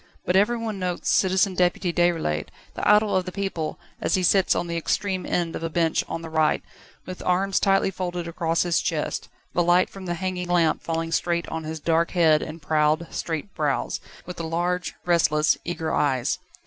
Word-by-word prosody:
But 180 - +1
everyone 220 +1 +1
notes 180 -1 -1
Citizen 190 +1 +3
Deputy 180 -1 +1
Déroulède, 165 - +1 0.3
the - - -3
idol 210 -1 +5
of 185 -1 +1
the 185 - -5
people, 185 -5 -3 0.2
as - - +1
he 185 - 0
sits 190 +2 +4
on - - -1
the 170 0 -4
extreme 185 +3 -1
end 170 -2 -1
of - - -5
a 165 - -2
bench 165 0 +1
on 165 - -4
the 165 - -6
right, 155 -1 +2 0.4
with 185 0 -7
arms 190 +2 +1
tightly 195 -1 +2
folded 175 -2 -4
across 165 0 0
his 175 -2 +1
chest, 155 -2 -2 0.2
the 175 - +2
light 175 +1 +3
from 190 -1 -9
the 175 - -1
hanging 185 0 -3
lamp 175 -2 +2
falling 165 0 -2
straight 170 0 0
on 160 -1 -4
his 160 0 -5
dark 165 +2 +1
head 160 -3 +5
and 160 0 -7
proud, 155 +2 +1
straight 165 +4 -4
brows, 150 -4 -1 0.3
with 180 - -8
the 170 - -4
large, 175 +2 -1
restless, 155 -3 +3
eager 165 -2 -2
eyes. 130 -4 +1
175 Hz, 190 wpm, -24 LUFS, 160-185 Hz, 0.4 s, idol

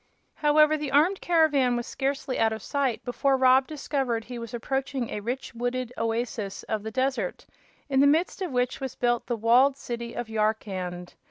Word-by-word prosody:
However, 305 +1 +4
the 295 -2 -4
armed 310 +8 +3
caravan 295 -7 +3
was 240 - -3
scarcely 270 -1 -2
out 225 0 +3
of 220 -2 -5
sight 275 -5 -1
before 270 +2 +1
Rob 260 0 +5
discovered 270 -6 -2
he 245 -1 -7
was 230 -1 -7
approaching 265 +1 -3
a - - -3
rich, 245 +6 -4
wooded 245 +1 -3
oasis 225 -3 -3
of 215 -1 -3
the 220 - -5
desert, 265 - -2 0.4
in 270 -2 +1
the 280 - +6
midst 325 +6 +1
of 370 - -2
which 250 0 0
was 265 -2 -4
built 240 -1 0
the 240 - 0
walled 250 +5 +4
city 235 -3 -6
of 240 - -4
Yarkand. 195 -5 -2
250 Hz, 180 wpm, -26 LUFS, 230-275 Hz, 0.4 s, the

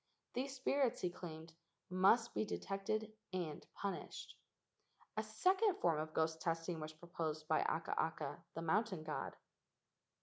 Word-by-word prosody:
These 265 +2 -1
spirits, 270 -1 +2
he 180 - +1
claimed, 160 -2 -7 0.3
must 195 +6 +5
be - - +2
detected 215 +2 -1 0.2
and 170 -5 -2
punished. 200 -1 -4 0.8
A 215 - +2
second 370 - +3
form 165 -3 +3
of 155 0 -2
ghost 160 0 +1
testing 165 0 0
was 155 0 -4
proposed 155 -2 -3
by 155 - +4
Akaaka, 160 -1 0
the 165 - -2
mountain 190 0 +2
god. 155 -1 -3
175 Hz, 130 wpm, -39 LUFS, 160-215 Hz, 0.8 s, must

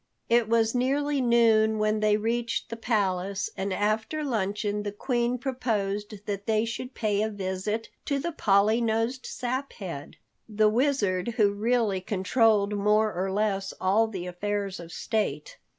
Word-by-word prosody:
It 235 -1 +3
was 225 -1 +3
nearly 275 +3 +1
noon 225 -3 +4
when 215 0 +1
they 210 0 +3
reached 230 +2 -1
the - - -2
palace, 200 -4 -1
and 195 +1 -3
after 215 +10 -1
luncheon, 210 -4 -1
the 205 0 -3
Queen 240 +3 -1
proposed 210 -5 -3
that 200 -1 -4
they 220 0 +2
should 250 +3 -6
pay 210 -2 0
a 220 - 0
visit 205 +2 -3 0.2
to 280 - 0
the 340 +5 -2
Polly 215 -4 +3
nosed 230 +3 -1
Saphead, 240 - -5 0.3
the 215 0 +3
Wizard 230 -4 +1
who 205 -3 +4
really 215 -2 +1
controlled 205 +2 +2
more 210 +1 +2
or 190 +2 -2
less 195 -1 -1
all 205 +4 +3
the 190 -5 -5
affairs 195 +1 -3
of 170 -1 -9
state. 220 - -2
215 Hz, 150 wpm, -27 LUFS, 200-235 Hz, 0.3 s, noon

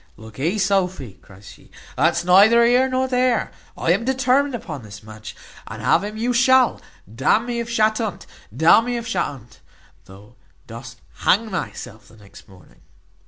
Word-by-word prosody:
"Lookee, 130 - -4
Sophy," 185 - -2
cries 100 +1 -17
he; - - -19 0.3
"that's 170 +5 +1
neither 210 +6 +5
here 250 +2 +3
nor 260 0 -1
there. 250 -2 0 0.3
I 165 - 0
am 195 +6 +1
determined 265 +2 +1
upon 155 - -7
this 105 -1 -12
match, 110 0 -11 0.3
and - - -9
have - - +1
him 210 +1 -6
you 240 +3 -1
shall, 255 +1 +3 0.3
d 125 +4 -9
n 225 - +3
me 240 -1 -4
if 235 0 -5
shat 220 -1 +1
unt. 215 -4 -5 0.3
D 135 +9 -5
n 225 - +6
me 245 0 -2
if 235 - -6
shat 230 - -1
unt, 125 -5 -13 0.5
though 100 +6 -17 0.3
dost 115 +1 -11 0.2
hang 220 +3 +1
thyself 125 - -7
the 110 - -19
next 100 -1 -17
morning." 90 -4 -20
195 Hz, 175 wpm, -20 LUFS, -, 0.5 s, n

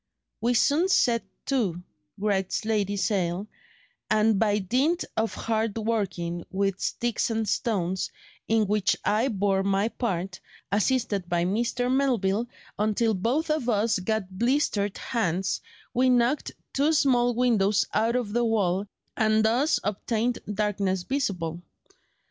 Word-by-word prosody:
"We 240 +2 +2
soon 300 +9 +3
set 240 -10 +3 0.2
to," 200 -11 -1 0.3
writes 200 0 -1
Lady 205 -2 0
Sale, 190 -2 0 0.6
"and 215 -1 +3
by 210 -2 +2
dint 260 - +1
of 225 0 -1
hard 220 -1 -1
working 190 -6 -2
with 195 -1 -1
sticks 240 0 -1
and 225 -1 -1
stones, 190 -5 -1 0.4
in 220 -1 +3
which 205 -1 +1
I 220 +5 +2
bore 195 -4 +1
my 195 +2 +1
part, 190 -6 -3 0.3
assisted 205 -3 0
by 175 -1 +1
Mr. 240 +5 0
Melville, 235 -5 +1 0.3
until 215 +2 +2
both 250 - 0
of 305 -6 0
us 215 -1 +2
got 190 -1 -3
blistered 235 -6 +1
hands, 190 -5 -1 0.3
we 255 +1 +3
knocked 245 +3 +2 0.2
two 290 +4 +2
small 245 -5 +3
windows 215 -5 +2
out 230 +2 +2
of 235 -5 -1
the 240 +1 +2
wall, 205 -4 +1 0.3
and 220 -1 +3
thus 255 +8 +2
obtained 225 +4 -1
'darkness 200 -3 -1
visible. 180 - -2
215 Hz, 130 wpm, -26 LUFS, 195-240 Hz, 0.6 s, soon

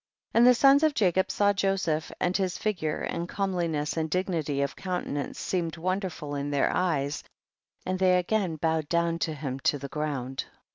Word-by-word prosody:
19. - - +4
And 240 - +7
the 250 - +6
sons 275 +1 +7
of 310 -2 +3
Jacob 190 -2 +2
saw 205 0 +3
Joseph, 185 -5 0
and 180 +1 0
his 185 -2 0
figure 175 -8 -2
and 170 +1 -3
comeliness 170 -6 -1
and 160 -1 -1
dignity 160 -5 0
of 140 - -3
countenance 180 -6 -3
seemed 170 -3 -2
wonderful 175 -4 -3
in 140 0 -2
their 140 -1 +1
eyes, 150 -5 0 0.6
and 185 0 -1
thev 185 -1 +4
again 180 -2 0
bowed 160 -1 -1
down 170 0 +1
to 160 -2 -1
him 135 -3 -4
to 145 - +1
the 140 0 -7
ground. 135 -4 -3
170 Hz, 180 wpm, -28 LUFS, 150-185 Hz, 0.6 s, And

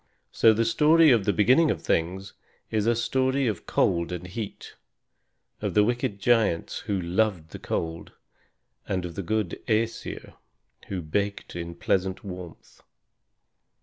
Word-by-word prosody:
So 115 - +5
the 115 +1 +1
story 155 +6 +5
of 115 -5 +3
the 105 - +3
Beginning 130 +11 +4
of - - -2
Things 95 +4 -1 0.4
is 110 0 0
a 120 - +3
story 130 +3 +1
of 105 -7 -3
cold 85 0 +1
and 90 0 -5
heat, 100 +3 -7 0.9
of - - -3
the 105 - +6
wicked 120 -2 -1
giants 105 -6 +1
who 100 -2 -2
loved 90 -2 0
the - - -8
cold, 80 0 -4 0.8
and 90 -2 -2
of 85 - -6
the 100 - -4
good 100 0 -2
Æsir, 115 0 -2 0.5
who 95 -3 -4
basked 100 +6 -3
in 85 0 -5
pleasant 95 +2 -1
warmth. 90 -4 -10
100 Hz, 145 wpm, -26 LUFS, 90-115 Hz, 0.9 s, the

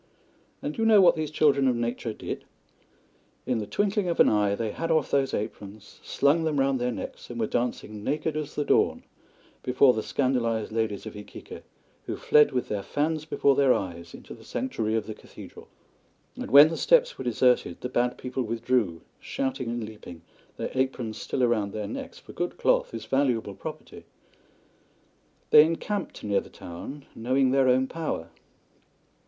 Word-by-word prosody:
And 145 - -2
do - - -4
you 225 - +3
know 215 -2 +7
what 180 -3 +6
these 155 -2 -3
children 140 -3 +3
of 125 - +2
nature 120 0 -2
did? - - -6 1.0
In 125 -2 0
the 105 - -5
twinkling 205 - 0
of 170 - -2
an - - +7
eye 105 -1 +2
they 110 0 -3
had 165 +8 -4
off 155 -3 +1
those 135 -1 +2
aprons, 105 0 -6
slung 150 +4 +2
them 155 -3 0
round 135 -1 +1
their 125 0 0
necks, - - -7
and 120 -1 -6
were 110 - +1
dancing 110 -3 -3
naked 150 +5 -1
as 155 -1 -4
the 145 - -1
dawn - - +2 0.6
before 130 +1 +4
the 110 - -2
scandalised 115 -4 0
ladies 110 -2 -2
of 110 - -8
Iquique, 105 0 -10 0.5
who - - -2
fled 150 0 +4
with 125 -1 -1
their 105 -1 -2
fans 155 +7 -2
before 140 -3 +2
their 135 -2 +4
eyes 85 -3 -6
into - - -11
the - - -14
sanctuary 110 -4 -2
of 110 -2 -1
the 110 - -6
cathedral. - - -13 0.7
And - - -6
when 145 +4 +9
the 165 - -4
steps - - +3
were - - -4
deserted 125 -6 +1
the - - -3
Bad 125 0 0
People 125 +1 -4
withdrew, 115 -7 0 0.2
shouting 130 -2 -3
and 120 0 -3
leaping, 105 -6 -10 0.3
their - - -4
aprons 130 -4 -2
still 130 - 0
round 110 -4 0
their 105 -1 -3
necks, - - -7
for - - -13
good 175 - -3
cloth - - +2
is - - -6
valuable 125 -7 0
property. 95 - -9 1.5
They 150 - +10
encamped 170 +5 -3
near 100 -2 +1
the - - -14
town, 135 +12 -9
knowing 130 +3 +1
their 135 -1 +3
own 130 +1 +3
power. 155 - -4
125 Hz, 180 wpm, -26 LUFS, 110-145 Hz, 1.5 s, They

